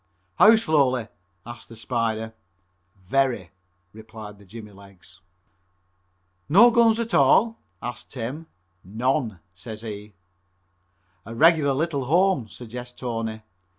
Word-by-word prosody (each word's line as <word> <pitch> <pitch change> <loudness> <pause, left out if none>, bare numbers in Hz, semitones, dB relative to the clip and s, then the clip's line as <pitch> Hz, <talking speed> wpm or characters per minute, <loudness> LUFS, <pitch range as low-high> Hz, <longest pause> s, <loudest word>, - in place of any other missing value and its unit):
"How 220 +2 +8
slowly?" 140 - +1 0.4
asks 120 +1 -10
the 115 - -12
Spider. 110 -1 -2 0.7
"Very," 125 - 0 0.4
replied 110 -1 -11
the 100 - -17
jimmy 105 +1 -11
legs. 95 -2 -17 1.3
"No 230 +9 +7
guns 230 -1 +4
at 230 -1 -3
all?" 185 - +4 0.2
asks 120 - -7
Tim. 135 +6 -6 0.4
"None," 110 0 -1
says 110 +4 -9
he. 105 -2 -8 1.1
"A 115 +4 -9
regular 155 0 +4
little 140 -2 -1
home," 170 - +2
suggests 125 +2 -10
Tony. 115 -3 -4
120 Hz, 110 wpm, -24 LUFS, 110-150 Hz, 1.3 s, How